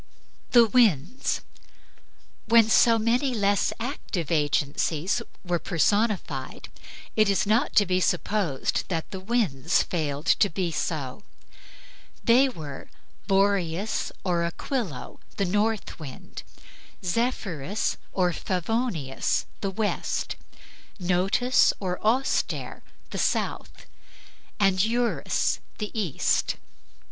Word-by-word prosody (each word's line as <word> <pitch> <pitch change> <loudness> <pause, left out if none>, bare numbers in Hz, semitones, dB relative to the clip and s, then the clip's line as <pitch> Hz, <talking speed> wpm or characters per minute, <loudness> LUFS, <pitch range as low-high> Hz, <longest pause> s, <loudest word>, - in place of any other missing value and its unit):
THE 240 -2 +7
WINDS 220 - +2 1.1
When 225 0 +5
so 230 0 +6
many 245 +4 +1
less 205 -2 +2
active 225 - -4
agencies 150 +2 +1 0.2
were 175 -1 0
personified, 185 - 0 0.5
it 215 -2 +4
is 200 - +2
not 220 +7 +1
to 205 - +6
be 185 0 +1
supposed 180 -5 0
that 165 -3 -3
the 190 - -5
winds 185 - +1
failed 150 -3 -3
to 200 - +4
be 180 -1 -2
so. 155 0 -3 1.0
They 255 +4 +5
were 150 - -8 0.4
Boreas 195 -1 +1
or 175 -3 +1
Aquilo, 170 - -4 0.2
the 200 - +1
north 210 +3 -1
wind; 140 -5 -9 0.6
Zephyrus 200 - -1
or 180 -2 +1
Favonius, 185 - -1
the 195 - -2
west; 205 +2 -2 0.6
Notus 190 +8 +3
or 180 -2 -3
Auster, 245 +5 0 0.3
the - - -4
south; - - -2 0.7
and 195 -2 +3
Eurus, 235 +2 0 0.2
the 210 -2 -4
east. 200 - 0
195 Hz, 100 wpm, -26 LUFS, 165-225 Hz, 1.1 s, THE